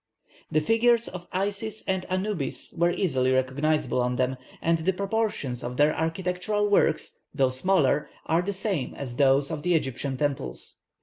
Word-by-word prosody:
The 155 - +3
figures 230 +6 +3
of 180 -1 -8
Isis 205 +3 -2
and 190 -1 -1
Anubis 185 -5 -3
are 170 - +5
easily 130 -8 +1
recognizable 130 +2 +1
on 125 0 0
them, 130 +1 0 0.2
and 165 0 +1
the 185 +4 +1
proportions 200 - -1
of 125 +1 -5
their 150 +1 +4
architectural 180 +5 0
works, 195 -6 +2 0.2
though 135 -1 +3
smaller, 150 +1 +2 0.2
are 165 +2 +2
the 195 +3 -2
same 190 - -2
as 125 -3 -6
those 140 +1 +3
of 155 -2 -3
the 180 +1 +2
Egyptian 135 -2 -2
temples. 135 - -3
160 Hz, 160 wpm, -26 LUFS, 135-190 Hz, 0.2 s, are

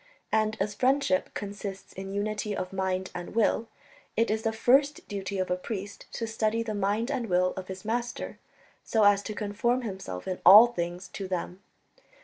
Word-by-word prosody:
And 220 0 +1
as 205 +2 -1
friendship 255 -4 +2
consists 200 -1 -6
in 195 0 -6
unity 210 0 -2
of 185 +1 -4
mind 190 -1 -1
and 175 +3 -7
will, 225 0 +2 0.5
it 230 -1 +3
is 220 0 0
the 225 - 0
first 270 +6 +2
duty 200 -1 -4
of 185 -1 -1
a - - +3
priest 200 +1 -6
to 230 - -2
study 225 0 0
the 220 -2 -3
mind 205 +5 0
and 240 -6 -2
will 180 0 +2
of 185 -1 -7
his 190 +1 -8
Master, 240 +2 -3 0.4
so 220 -2 +2
as 205 -1 +5
to 215 +1 -6
conform 230 +5 0
himself 190 - -6
in 185 -1 -3
all 205 +6 +11
things 175 -5 -4
to 195 0 -6
them. 180 0 -4
205 Hz, 180 wpm, -28 LUFS, 190-225 Hz, 0.5 s, all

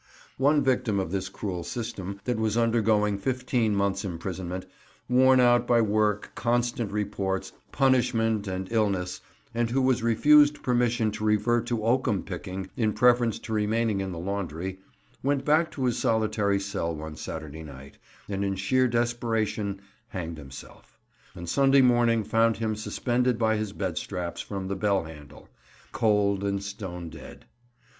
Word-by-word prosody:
One 145 +2 +4
victim 125 -6 +1
of 95 -3 -3
this 95 -1 -2
cruel 95 -3 -4
system, 100 -2 -5
that 125 -3 -1
was 110 0 0
undergoing 110 -3 +2
fifteen 125 -2 0
months' 100 -1 0
imprisonment, 90 0 -5 0.4
worn 130 +1 +5
out 120 -1 +4
by 120 -1 +4
work, 105 -1 +1
constant 120 -2 0
reports, 100 -2 -2 0.2
punishment, 115 -5 +2
and 95 0 -3
illness, 100 -5 0 0.3
and 115 0 0
who 130 +3 +1
was 130 -2 +2
refused 145 +6 +5
permission 120 -3 +1
to 110 +1 -6
revert 115 +2 +2
to 120 -3 -1
oakum 120 -3 +1
picking 95 0 -6
in 110 -4 +1
preference 120 0 +3
to 110 - -6
remaining 110 -1 +1
in 95 -1 -3
the 85 - -6
laundry, 95 0 -4 0.4
went 140 0 0
back 155 +2 +3
to 135 - -2
his 125 - 0
solitary 105 -3 +1
cell 90 -4 -3
one 80 0 -7
Saturday 80 0 -7
night, 70 -3 -12 0.3
and 100 -1 -2
in 100 -1 -1
sheer 130 +7 +2
desperation 115 -4 -1 0.3
hanged 85 -7 -6
himself; 70 -1 -12 0.4
and 85 - -8
Sunday 135 +7 +4
morning 120 -2 +3
found 115 +2 +2
him 110 -1 -1
suspended 120 +3 0
by 110 -1 +2
his 105 -1 -2
bed 95 -5 -3
straps 85 -1 -4
from 95 -2 -5
the 100 - -2
bell 100 -1 +1
handle, 75 -3 -12 0.4
cold 100 -2 +2
and 100 0 -1
stone 95 -4 -6
dead. - - -12
105 Hz, 150 wpm, -27 LUFS, 95-120 Hz, 0.4 s, worn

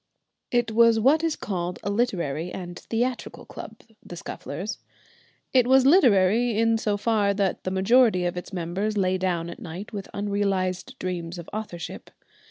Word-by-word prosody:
It 240 -2 +1
was 230 0 +5
what 285 +8 +4
is 325 -2 +1
called 180 -3 -3
a 200 - -1
literary 180 - -1
and 175 -1 -7
theatrical 245 +2 -3
club, - - -10 0.2
the 175 - -9
Scufflers. 175 +3 -6 0.7
It 250 -2 +5
was 265 0 +5
literary 235 - +4
in 225 0 +3
so 210 -2 0
far 205 -2 +1
that 195 -2 -1
the - - 0
majority 190 0 +3
of 175 - -1
its 180 - -7
members 190 +4 -2
lay 185 -1 +1
down 175 -3 -1
at - - -8
night 185 +7 -8
with 200 -2 -6
unrealised 200 +2 -1
dreams 175 -1 -4
of 170 - -8
authorship. 210 -6 -6
200 Hz, 160 wpm, -25 LUFS, 180-230 Hz, 0.7 s, was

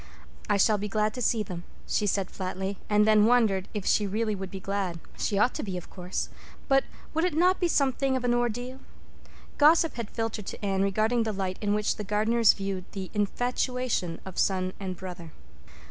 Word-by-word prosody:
"I 205 - +3
shall 210 +1 +4
be 210 - -2
glad 215 +1 0
to 250 - -5
see 225 -2 +2
them," 180 -3 -7 0.2
she 210 - 0
said 195 -1 0
flatly; 190 +1 -4
and 210 0 +4
then 215 0 +5
wondered 220 -6 +3
if 205 -3 -4
she 210 - +3
really 215 +2 0
would 195 -1 -5
be 195 - -6
glad. 190 -3 -2 0.2
She 200 - -1
ought 215 +5 +3
to - - -3
be, 190 -3 -4
of 175 - -9
course. 180 -1 -4 0.4
But 270 0 +4 0.3
would 320 +2 +1
it 355 -4 +1
not 360 +3 +4
be 355 - +2
something 270 -3 +1
of 255 - -5
an 245 -1 +2
ordeal? 240 +2 -1 0.8
Gossip 315 0 +5
had 235 -3 -4
filtered 225 -3 -3
to - - -5
Anne 195 -1 +1
regarding 215 +4 +2
the 225 -1 0
light 190 -2 -3
in 205 -1 +1
which 210 0 0
the 210 - -4
Gardners 215 +3 +4
viewed 195 -2 -4
the 190 -2 -5
"infatuation" 245 -3 -1
of 190 -1 -6
son 185 -1 +1
and 185 -2 -4
brother. 175 -4 -8
210 Hz, 200 wpm, -28 LUFS, 190-240 Hz, 0.8 s, then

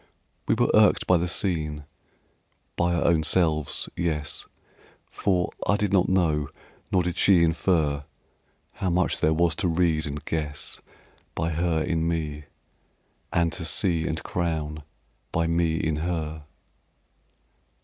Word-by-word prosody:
We - - +3
were - - +2
irked - - +5
by 90 - +4
the 85 +1 -1
scene, 80 -5 -1 0.9
by 85 0 +1
our 85 - 0
own 85 -2 +4
selves; 80 -2 +2
yes, 80 -3 -2 0.6
For 90 -3 0 0.2
I 100 - +3
did 105 -2 -1
not 95 -2 +3
know, 80 -6 +1 0.4
nor 90 -2 +3
did 90 +1 -3
she 90 -4 +5
infer 80 -4 +1 0.7
How 95 - -3
much 90 +1 +1
there 80 - +2
was 85 0 +2
to 100 - +1
read 80 -2 +1
and 75 0 -6
guess 75 -2 -3 0.5
By 80 +1 -1
her 80 0 0
in 80 -1 0
me, 75 -3 -3 0.9
and 85 -1 +1
to 85 0 -5
see 85 0 +2
and 80 0 -3
crown 80 -3 -2 0.5
By 85 0 +1
me 85 -1 +1
in 80 -2 -1
her. 80 -2 -3
85 Hz, 140 wpm, -25 LUFS, 80-90 Hz, 0.9 s, irked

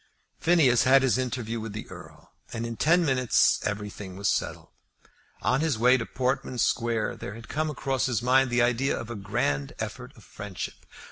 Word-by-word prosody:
Phineas 155 -8 +4
had 135 +1 +6
his 130 -1 +2
interview 120 -3 -3
with 110 -1 -6
the 105 - -6
Earl, - - -13 0.2
and 115 -1 -4
in 115 0 -4
ten 170 +7 +3
minutes 130 -4 +3
everything 105 -2 -5
was 100 +1 -2
settled. - - -2 0.7
On 130 - +2
his 155 -7 +1
way 125 +3 +5
to 120 -3 -2
Portman 130 -1 -2
Square 115 -1 0
there 100 - -7
had 115 0 -11
come 155 +1 -1
across 135 -2 -1
his 125 -4 0
mind 130 +1 +4
the 120 0 +3
idea 125 +3 +1
of 120 -1 -7
a - - -4
grand 70 -8 -1
effort - - -6
of - - -16
friendship. 105 -3 -8
120 Hz, 185 wpm, -27 LUFS, 110-130 Hz, 0.7 s, had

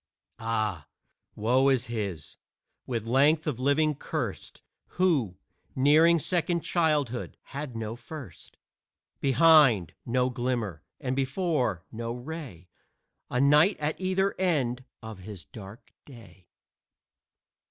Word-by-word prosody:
Ah, 110 -9 -2 0.5
woe 125 +5 +3
is 130 -2 +2
his, 100 - -5 0.5
with 115 -4 -3
length 145 +6 +3
of 140 -6 -2
living 145 +3 +2
cursed, 140 - -5 0.3
Who, 145 - +2 0.4
nearing 155 +5 +5
second 170 +1 0
childhood, 150 -9 0 0.2
had 140 -3 -5
no 115 0 -4
first. 120 - -11 0.6
Behind, 135 - +5
no 125 +1 0
glimmer, 120 - -2 0.2
and 130 -3 -2
before 135 - -1
no 115 +1 -4
ray 125 - -8 0.6
A 125 - -1
night 150 +8 +5
at 150 +4 -2
either 190 +1 +1
end 130 -9 0 0.2
of 110 -3 -8
his 95 -1 -9
dark 105 +3 -12 0.2
day. 95 - -15
130 Hz, 110 wpm, -28 LUFS, 110-155 Hz, 0.6 s, nearing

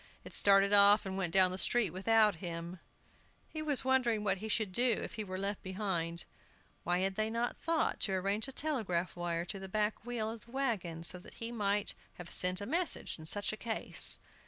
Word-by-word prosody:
It - - -10
started 200 0 +4
off 205 +1 +6
and 190 -1 -4
went 190 -3 -2
down 185 0 +6
the 185 - -2
street 235 -5 +2
without 210 +1 +3
him! 170 0 -6 0.7
He 310 - -6
was 290 -4 +3
wondering 245 -5 +2
what 195 -2 +1
he 220 +2 -6
should 215 -2 0
do 240 +3 +2
if - - -6
he 220 -2 -4
were 185 -2 -6
left 200 +1 -2
behind 185 -4 -3 0.6
(why 175 +1 0
had 195 0 0
they 215 +2 -1
not 235 +2 -2
thought 330 -1 -1
to 195 - 0
arrange 200 +4 -1
a - - -7
telegraph 220 - -2
wire 175 -1 -3
to 195 +2 -5
the 190 0 -8
back 210 +2 -1
wheel 230 -2 -3
of 225 -1 -10
the 235 - -18
wagon, 200 -12 -2
so 180 +1 0
that - - -13
he 230 +1 -6
might 205 -3 -1 0.2
have 175 -1 -8
sent 180 +2 +1
a - - -4
message 335 - +1
in 155 - -6
such 205 +4 +1
a - - -6
case!) 225 -1 +1
200 Hz, 210 wpm, -33 LUFS, 185-225 Hz, 0.7 s, off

